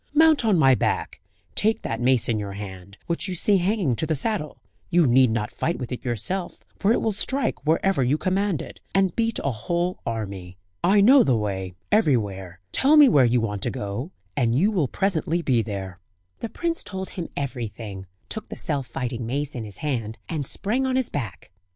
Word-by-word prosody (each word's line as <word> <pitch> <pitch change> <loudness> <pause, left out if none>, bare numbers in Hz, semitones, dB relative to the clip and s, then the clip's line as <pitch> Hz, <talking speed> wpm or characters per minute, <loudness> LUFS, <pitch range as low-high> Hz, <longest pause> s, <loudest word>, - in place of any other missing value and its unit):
Mount 315 -3 +5
on 215 -5 +3
my 135 -4 +6
back, - - -1 0.3
take 220 +1 +1
that 115 +1 -3
mace 125 -1 +3
in 110 -2 0
your 100 -1 -5
hand, 100 -1 -9
which 170 +2 -2
you 185 - -3
see 200 +4 +5
hanging 185 - +1
to 160 - -1
the 160 - +1
saddle; 155 -1 -2 0.3
you 175 -2 +4
need 130 0 +5
not 110 -1 -1
fight 170 - -2
with 125 - -6
it 125 - -5
yourself, 130 - -4
for 200 - +1
it 235 - +3
will 220 - +2
strike 255 +5 0
wherever 165 0 +2
you 130 +4 +2
command 190 -3 0
it, - - -11 0.2
and 195 -3 +2
beat 230 -1 0
a 140 - +1
whole 170 +11 -2
army. 100 -5 -5 0.3
I 200 +2 +5
know 260 +6 +7
the 130 - +3
way 95 -3 -3 0.2
everywhere; 100 - +1
tell 290 +3 +4
me 295 -3 +9
where 135 - +5
you 120 0 +2
want 105 -3 -3
to 120 - +1
go, 105 - -4 0.3
and 115 -1 +1
you 190 - +3
will 175 -10 +1
presently 175 -1 0
be 125 -6 +2
there." 95 -4 -6 0.4
The 230 - -4
prince 335 +5 -2
told 190 -1 -6
him 175 -3 -5
everything; 110 -8 -5 0.2
took 220 0 -6
the - - -7
self 140 -5 -2
fighting 120 -2 -4
mace 145 +4 -2
in 120 -5 -4
his 100 -3 -9
hand, 115 -6 -2
and 150 -5 -3
sprang 250 +6 -1
on 260 - 0
his 260 -2 0
back. 115 -12 -5
140 Hz, 200 wpm, -24 LUFS, -, 0.4 s, me